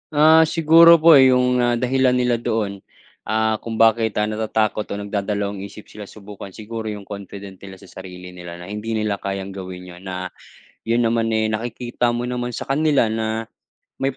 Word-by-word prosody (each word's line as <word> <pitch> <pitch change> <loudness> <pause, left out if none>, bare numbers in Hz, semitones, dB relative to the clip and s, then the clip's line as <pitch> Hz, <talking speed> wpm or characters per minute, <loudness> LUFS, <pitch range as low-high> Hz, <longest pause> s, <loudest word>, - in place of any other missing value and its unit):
Ah, 160 +2 +6
siguro 165 +1 +6
po, 165 0 +7
eh, 130 -1 +7
'yong, 125 -1 +2
ah, 120 0 +2
dahilan 130 +1 +2
nila 125 -1 +1
doon, 110 -4 -3 0.4
ah, 110 0 0
kung 115 -1 -5
bakit, 115 0 +3
ah, 105 - +1
natatakot 110 0 -1
o 100 - -4
nagdadalawang-isip 100 0 -4
sila 105 - -10
subukan, 100 -1 -11
siguro 110 +2 -6
'yong 100 -2 -9
confident 100 -1 -9
nila 95 0 -12
sa 95 - -16
sarili 90 -1 -11
nila 85 -1 -9
na 85 - -10
hindi 105 +2 -5
nila 110 -2 -1
kayang 95 0 -5
gawin 90 -1 -8
'yon 90 +1 -13
na 90 -1 -5 0.6
'yon 115 +1 0
naman, 115 0 0
eh, 110 0 +1
nakikita 120 +2 -2
mo 120 +1 -3
naman 125 0 -3
sa - - -6
kanila 145 -2 +2
na 110 0 -3 0.5
may 135 -1 -1
110 Hz, 180 wpm, -21 LUFS, 100-120 Hz, 0.6 s, po